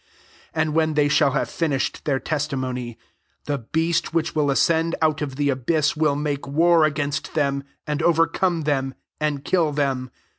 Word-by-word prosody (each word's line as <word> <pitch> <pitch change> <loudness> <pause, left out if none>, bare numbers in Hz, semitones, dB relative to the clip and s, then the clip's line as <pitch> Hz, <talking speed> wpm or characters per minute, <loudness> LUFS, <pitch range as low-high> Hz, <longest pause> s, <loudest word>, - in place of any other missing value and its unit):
7 - - -2
And - - -4
when 160 -1 +2
ihey 145 -1 +3
shall 140 - +3
have 140 - 0
finished 145 -5 -2
their 135 -3 +1
testimony, 130 -6 -3 0.5
the 145 -1 -1
beast 160 +7 -1
which 165 0 0
will 150 -2 +1
iscend 165 +4 +2
out 155 -1 +1
of 140 -3 -3
the 145 +1 0
abyss 145 +4 +1
will 150 -2 +2
nake 145 -1 -2
war 165 +3 +4
against 145 -1 -2
them, 140 -2 0 0.2
and 150 0 -2
overcome 165 +1 +2
them, 135 -3 -1 0.2
and 145 -2 -2
kill 170 -5 +2
them. 135 -3 -1
150 Hz, 170 wpm, -23 LUFS, 140-160 Hz, 0.5 s, war